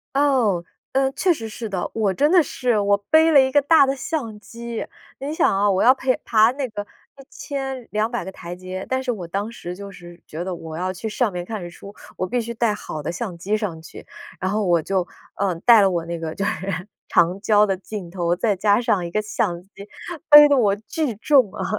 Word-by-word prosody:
哦， 255 -11 +2 0.3
嗯， 270 0 +1
确 365 -2 +2
实 225 -6 -7
是 225 +1 -6
的， 185 -3 -3
我 210 -4 0
真 295 - +2
的 365 - +6
是 250 -7 0
我 200 0 +3
背 320 +1 +5
了 285 - +8
一 265 0 +2
个 290 +2 +4
大 300 +1 +5
的 270 0 -1
相 245 -5 -4
机。 235 +2 -7 0.3
你 280 +3 -4
想 - - +3
啊， 205 +1 +3
我 190 -1 +2
要 255 - +7
陪 260 -1 0
爬 220 +1 +4
那 270 -1 -4
个 210 -1 -5 0.4
1200 255 -6 -4
个 190 - -6
台 175 -2 -8
阶， 185 +1 -7
但 260 0 -1
是 260 - -2
我 190 -7 -4
当 200 +6 -3
时 180 -6 -7
就 200 +1 -9
是 175 -2 -13
觉 165 +3 -6
得 185 -1 -4
我 160 -1 -8
要 185 +2 -2
去 205 +4 -6
上 220 0 0
面 175 -1 -4
看 210 -1 -6
日 175 - -6
出， 200 +3 -12 0.2
我 185 - -2
必 245 +4 0
须 235 0 -5
带 230 -1 +1
好 155 -7 -6
的 150 - -3
相 175 0 -5
机 200 +5 -1
上 180 -7 -4
去。 - - -12 0.3
然 185 - -2
后 210 0 0
我 175 -3 +3
就， 190 +2 -1 0.4
嗯， 185 -4 -1
带 235 -3 +8
了 195 - +4
我 170 -2 -2
那 170 0 -4
个 165 -1 -5
就 195 - -2
是 190 -2 -3 0.2
长 175 +3 +2
焦 210 0 +4
的 195 -2 0
镜 195 -1 -8
头， 175 -2 0
再 210 +1 +1
加 205 +3 +3
上 200 -6 0
一 170 - -5
个 215 - 0
相 180 -4 -2
机， 195 - -28 0.6
背 295 0 +10
得 285 - +4
我 205 -5 +3
巨 230 +5 -3
重 250 -3 +3
啊。 - - -4
210 Hz, 240 characters per minute, -22 LUFS, 185-250 Hz, 0.6 s, 背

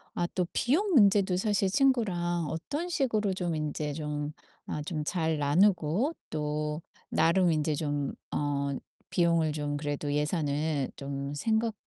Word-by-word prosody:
아 175 - +1
또 180 -2 0
비용 335 - +2
문제도 200 - +5
사실 195 0 +1
친구랑 185 - +1
어떤 285 - -3
식으로 225 - +1
좀 180 -2 -2
인제 150 -1 -2
좀 150 -1 -3 0.3
아 150 - -3
좀 155 -2 -2
잘 160 0 0
나누고 175 - +3 0.2
또 150 0 -2 0.3
나름 175 +1 +3
인제 155 -1 +1
좀 145 -2 -2 0.2
어 140 -1 0 0.4
비용을 170 -3 +2
좀 145 -1 -2
그래도 145 0 -2
예산을 150 -2 0
좀 140 0 -4
생각 220 +8 +1
160 Hz, 240 characters per minute, -29 LUFS, 150-195 Hz, 0.4 s, 문제도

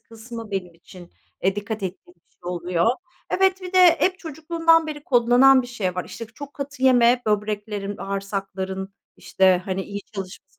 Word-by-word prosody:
kısmı 230 0 -10
benim 180 -3 -4
için, 175 +1 -15 0.3
eee, 195 +2 +1
dikkat 205 0 -4
ettiğim 180 -1 -7
bir 170 - -40
şey - - -41
oluyor. 175 +1 -1 0.4
Evet, 380 0 +2
bir 365 0 -7
de 370 - +4 0.2
hep 370 0 +2
çocukluğumdan 330 0 +1
beri 295 -1 -7
kodlanan 250 +2 +5
bir - - -8
şey 200 -7 -3
var. 180 - -3
İşte, 230 - -8
çok 280 +6 -11
katı 280 -1 -7
yeme. 245 -1 +5
Böbreklerin, 210 -1 -2
bağırsakların 195 -1 -4 0.2
işte, 185 -1 +2
hani, 190 0 -2
iyi 200 +1 -6
çalışması 190 -1 -9
210 Hz, 165 wpm, -23 LUFS, 190-265 Hz, 0.4 s, kodlanan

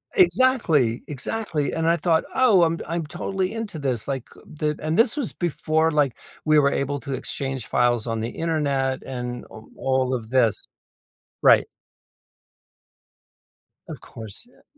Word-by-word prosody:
Exactly. 235 - +3
Exactly, 150 +1 -3
and 165 0 0
I 170 - +4
thought, 165 -1 +2
"Oh, 240 -8 +5
I'm 165 0 +2
d - - -7
I'm 170 0 -2
totally 190 +3 -2
into 210 -8 -5
this." 130 -5 -2
Like, 135 -3 -3
uh, - - -15 0.2
thi 150 -1 +1
and 155 +1 -1
this 230 +4 +3
was 275 - -3
before, 160 -1 0
like, 145 -5 +2 0.3
we 155 -1 +5
were 140 -1 +3
able 140 +1 -1
to 140 - -5
exchange 135 -1 -4
files 120 -2 +1
on 115 -1 -2
the 115 +2 -2
internet 140 -5 -1
and 125 -1 -5
o 110 0 -12
all 130 -1 0
of 115 -3 -4
this 125 -5 +2 0.8
Right. - - +6 2.2
Of - - -7
course, 110 - -11
yea 245 - -25
145 Hz, 155 wpm, -24 LUFS, 130-170 Hz, 2.2 s, Right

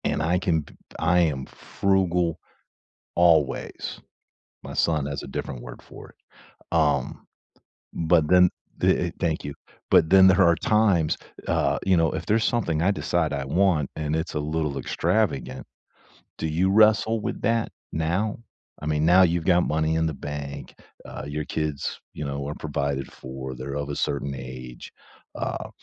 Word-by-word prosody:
And - - 0
I 90 +3 +2
can 80 -4 +1
p - - -17
p - - -24
I 90 +2 +3
am 75 -6 +1
frugal 90 -4 0 0.8
always. 80 -5 +1 0.7
My - - -7
son 75 -4 +1
has 70 -1 -4
a - - -8
different 65 -2 -5
word - - -10
for - - -13
it, - - -25 0.6
um, 75 -5 +1 0.7
but 80 -1 +2
then 90 +1 +6 0.3
the, - - +2
uh - - -5
Thank 80 -2 -1
you. 70 - -4 0.4
But 80 - +5
then 95 0 +8
her 95 +1 +5
are 85 - +5
times 100 -8 +2 0.3
uh, - - +1
you 95 -1 +4
know, 80 -1 +3
if 80 +2 -4
there's 110 +1 +2
something 85 -11 0
I 95 +4 +3
decide 85 -4 0
I 70 -1 -2
want 80 -1 +2
and 75 -1 -2
it's 80 +1 -3
a 75 - -1
little 75 -1 -2
extravagant, 70 - -1 0.7
do - - -3
you 85 +5 +1
wrestle 110 +2 +4
with - - -4
that 115 +1 +1 0.2
now? 90 +7 -1 0.4
I - - -5
mean, 75 0 +1
now 90 +2 +7
you've 85 -2 +2
got 90 0 +4
money 80 +1 +1
in 80 0 +1
the 80 - -2
bank, 70 -1 -7 0.3
uh, - - -7
your 75 +1 -3
kids, 75 -3 -3
you 75 - -6
know, 70 0 -3
are 75 - -4
provided 70 -3 -3
for, 65 0 -7
they're 65 +3 -6
of 70 -1 -3
a 70 - -3
certain 70 -1 -2
age, 65 -1 -9 0.5
uh, - - -4
80 Hz, 170 wpm, -25 LUFS, 70-90 Hz, 0.8 s, then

